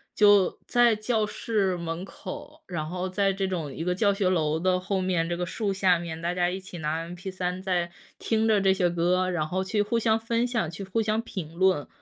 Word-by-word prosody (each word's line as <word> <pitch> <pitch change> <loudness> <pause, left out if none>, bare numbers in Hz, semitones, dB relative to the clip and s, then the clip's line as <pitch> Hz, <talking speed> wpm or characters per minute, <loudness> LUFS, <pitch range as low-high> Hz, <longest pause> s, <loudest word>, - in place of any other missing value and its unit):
就 205 -2 +5
在 240 -2 +4
教 215 0 0
室 210 -3 0
门 170 +1 -4
口， 190 -1 -9
然 170 -4 -3
后 180 +2 -3
在 195 +1 +2
这 195 0 -1
种 165 -7 -3
一 165 - -4
个 180 +1 +1
教 200 +1 +3
学 195 -1 0
楼 160 -3 +1
的 180 +1 +2
后 190 +1 -1
面， 180 -3 0
这 175 - 0
个 180 - -1
树 200 +3 -2
下 185 -2 +3
面， 165 -1 -5
大 170 +1 -1
家 175 -1 +1
一 185 +2 -3
起 185 -1 -10
拿 160 +2 -2
mp3 180 0 -4
在 180 -3 -1 0.3
听 225 0 +1
着 215 -2 +4
这 195 0 +4
些 180 -2 +2
歌， 180 +2 +1
然 165 -4 -1
后 185 +4 -1
去 205 +2 0
互 230 +3 0
相 225 -1 +2
分 230 +1 0
享、 230 -10 -1
去 170 +4 -7
互 195 +4 -1
相 215 +1 0
评 175 -8 -7
论。 185 -5 +2
185 Hz, 245 characters per minute, -27 LUFS, 175-205 Hz, 0.3 s, 就